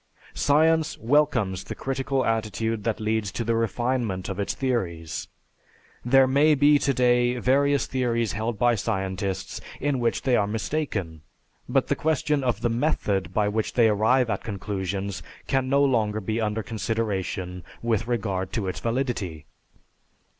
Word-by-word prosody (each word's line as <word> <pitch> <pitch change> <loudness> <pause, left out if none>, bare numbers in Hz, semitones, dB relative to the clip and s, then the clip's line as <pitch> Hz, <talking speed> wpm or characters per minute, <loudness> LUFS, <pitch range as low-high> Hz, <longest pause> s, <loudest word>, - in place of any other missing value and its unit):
Science 160 +2 +2
welcomes 115 -7 +1
the - - -6
critical 135 0 -1
attitude 110 0 -1
that 115 -2 0
leads 110 -2 -1
to 115 - -3
the 115 +1 0
refinement 115 -3 -1
of 95 - -4
its 100 - -1
theories. 85 - -2 0.8
There 135 +2 +5
may 145 +4 +4
be 145 +1 +5
today 125 -2 +2
various 140 +3 +2
theories 120 -4 0
held 110 +2 -2
by 120 +3 +3
scientists 95 -3 -3 0.2
in 140 -2 0
which 120 -1 0
they 130 -2 +3
are 100 -3 +2
mistaken, 105 - -3 0.5
but - - +2
the - - 0
question 150 -2 0
of 120 -4 0
the 120 - +2
method 115 -6 0
by 105 -1 +1
which 110 +1 -1
they 115 -2 +5
arrive 110 +5 +3
at 100 - -3
conclusions 100 -1 -4 0.2
can 135 -1 0
no 140 +1 +4
longer 110 -6 +1
be 110 +3 -2
under 110 0 -1
consideration 100 -5 -3 0.2
with 115 -1 0
regard 95 -5 -2
to 105 -5 -1
its 90 - -3
validity. 115 - -2
115 Hz, 145 wpm, -25 LUFS, 100-130 Hz, 0.8 s, There